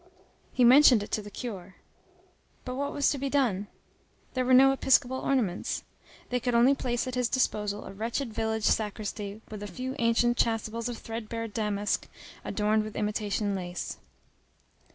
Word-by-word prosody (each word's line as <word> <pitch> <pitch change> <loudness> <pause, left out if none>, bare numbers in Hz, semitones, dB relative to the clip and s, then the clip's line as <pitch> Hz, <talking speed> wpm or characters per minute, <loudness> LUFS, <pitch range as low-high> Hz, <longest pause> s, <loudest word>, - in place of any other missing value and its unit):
He 250 - +2
mentioned 250 -3 +7
it - - -10
to 215 - 0
the 205 - -10
curé. 195 -5 -7 0.9
But 250 - -4
what 280 +2 -2
was 285 - +2
to 280 - -3
be 275 +1 -2
done? 235 -8 +1 0.7
There 255 - 0
were 255 - 0
no 270 +1 +7
episcopal 260 -1 +2
ornaments. 225 -10 -1 0.5
They 250 - +1
could 245 0 -1
only 245 +4 +6
place 245 -3 -2
at 255 - -5
his 250 -2 0
disposal 210 -5 0
a - - -8
wretched 230 +4 -3
village 220 0 -1
sacristy, 210 -1 -1
with 210 -1 -7
a 205 - -5
few 255 +5 -5
ancient 235 +1 +2
chasubles 230 +1 0
of 240 - -5
threadbare 230 0 -5
damask 210 -2 -1 0.4
adorned 215 0 +1
with 215 0 -8
imitation 210 -1 -1
lace. 180 -2 -5
230 Hz, 160 wpm, -28 LUFS, 210-250 Hz, 0.9 s, mentioned